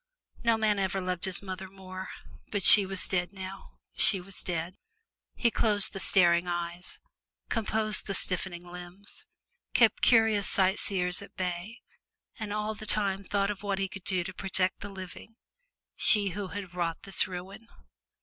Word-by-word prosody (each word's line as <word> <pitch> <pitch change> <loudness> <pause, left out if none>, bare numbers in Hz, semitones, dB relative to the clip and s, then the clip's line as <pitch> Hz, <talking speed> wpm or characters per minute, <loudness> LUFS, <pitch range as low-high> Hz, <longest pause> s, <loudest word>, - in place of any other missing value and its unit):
No 230 -1 +3
man 215 -2 +1
ever 195 0 0
loved 180 -1 -1
his 190 0 +2
mother 190 0 -6
more, 185 0 -9 0.4
but 200 -2 -1
she 200 0 +8
was 195 -1 -3
dead 180 -1 -1
now 190 0 -9 0.2
she 195 - +4
was 185 +1 -7
dead. 170 0 -3 0.6
He 235 - +2
closed 210 -3 +3
the 195 - -5
staring 175 -2 +4
eyes, 175 0 -5 0.5
composed 215 -1 -1
the 195 - -2
stiffening 180 -1 +1
limbs, 180 +3 -8 0.5
kept - - +4
curious 225 -4 +4
sightseers 190 -1 +1
at 200 - -13
bay, 185 +4 -4 0.6
and 215 -2 -4
all 210 +1 -2
the 215 0 -8
time 200 -2 +2
thought 200 +1 0
of 200 -1 -7
what 200 -1 -2
he 195 0 -1
could 190 0 -10
do 185 -2 0
to 190 +2 -6
protect 190 0 0
the 205 - -7
living 190 +3 -10 0.6
she 205 -2 +5
who 195 +2 -4
had 190 -2 -7
wrought 170 -2 -2
this 195 - +3
ruin. 190 +4 -8
190 Hz, 160 wpm, -29 LUFS, 180-205 Hz, 0.6 s, she